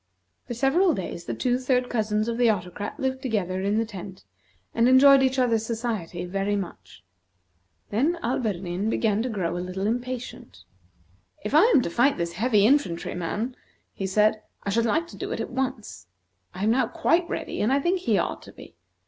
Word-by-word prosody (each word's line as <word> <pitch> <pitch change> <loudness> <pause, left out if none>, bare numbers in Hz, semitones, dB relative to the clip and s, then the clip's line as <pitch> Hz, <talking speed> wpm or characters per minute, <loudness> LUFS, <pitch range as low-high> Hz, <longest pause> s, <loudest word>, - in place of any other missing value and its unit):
For 240 - -4
several 305 +8 +3
days 175 -2 -6
the - - -3
two 250 -1 0
third 250 -1 +1
cousins 215 -2 0
of 235 0 -2
the 240 -2 +5
Autocrat 205 - -3
lived 260 -1 -2
together 195 -8 -1
in 200 +2 0
the 225 - +1
tent, 195 -3 -9 0.5
and 230 +1 +3
enjoyed 275 +1 +7
each 265 0 +1
other's 230 -4 +2
society 220 -7 -3
very 195 +3 -1
much. 170 - -7 0.9
Then 290 +11 +1
Alberdin 200 -5 -1
began 220 -2 +1
to 250 - -2
grow 180 -6 -2
a - - -2
little 185 +2 -4
impatient. 240 - -4 0.8
"If 210 - -4
I 310 +7 +7
am 445 - +4
to - - -2
fight 265 +9 +3
this 170 -1 -2
heavy 210 +1 +3
infantry 240 -10 +1
man," 210 +8 -3 0.4
he 195 - -3
said; 215 +2 +2 0.2
"I 200 - -2
should 230 +3 +2
like 320 +8 +1
to - - -11
do - - -5
it - - -3
at - - -4
once. 245 - -4 0.5
I 190 - -4
am 215 - +3
now 260 +3 +2
quite 335 +1 +1
ready, - - -4
and 215 - +2
I 275 - +3
think 350 +6 +1
he 365 - +1
ought - - -2
to - - -13
be. - - -14
225 Hz, 190 wpm, -25 LUFS, 195-260 Hz, 0.9 s, enjoyed